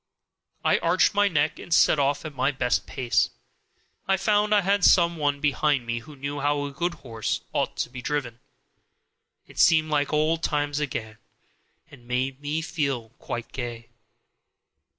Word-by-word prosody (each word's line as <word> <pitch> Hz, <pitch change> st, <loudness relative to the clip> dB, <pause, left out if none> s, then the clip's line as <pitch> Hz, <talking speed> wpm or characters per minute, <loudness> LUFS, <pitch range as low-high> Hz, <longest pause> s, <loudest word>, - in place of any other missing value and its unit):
I -, -, +4 dB
arched 180 Hz, +5 st, +3 dB
my 205 Hz, 0 st, +3 dB
neck 155 Hz, -5 st, 0 dB
and -, -, -11 dB
set 155 Hz, -, +5 dB
off 140 Hz, +2 st, 0 dB
at 155 Hz, -, -6 dB
my 130 Hz, +1 st, +1 dB
best 130 Hz, -3 st, 0 dB
pace. 125 Hz, -3 st, +1 dB, 0.8 s
I 195 Hz, 0 st, +3 dB
found 210 Hz, +1 st, +2 dB
I 210 Hz, -1 st, +5 dB
had 200 Hz, 0 st, +1 dB
some 170 Hz, -2 st, +5 dB
one 145 Hz, -2 st, 0 dB
behind 145 Hz, -2 st, +1 dB
me 120 Hz, 0 st, -2 dB
who 145 Hz, +6 st, -13 dB
knew 140 Hz, +1 st, -5 dB
how 145 Hz, 0 st, 0 dB
a 140 Hz, -, -5 dB
good 170 Hz, +5 st, -2 dB
horse 115 Hz, -3 st, -3 dB
ought -, -, -1 dB
to -, -, -2 dB
be 125 Hz, -, -7 dB
driven. 125 Hz, -4 st, -3 dB, 1.1 s
It -, -, -12 dB
seemed 155 Hz, -2 st, +4 dB
like 145 Hz, -1 st, +1 dB
old 155 Hz, +2 st, +1 dB
times 145 Hz, -2 st, -1 dB
again, 110 Hz, -7 st, -4 dB, 0.7 s
and 120 Hz, -4 st, -16 dB
made 130 Hz, +2 st, -2 dB
me 150 Hz, +2 st, -2 dB
feel 140 Hz, -9 st, -2 dB
quite 120 Hz, -1 st, -6 dB
gay. 120 Hz, -2 st, -6 dB
145 Hz, 165 wpm, -25 LUFS, 130-160 Hz, 1.1 s, set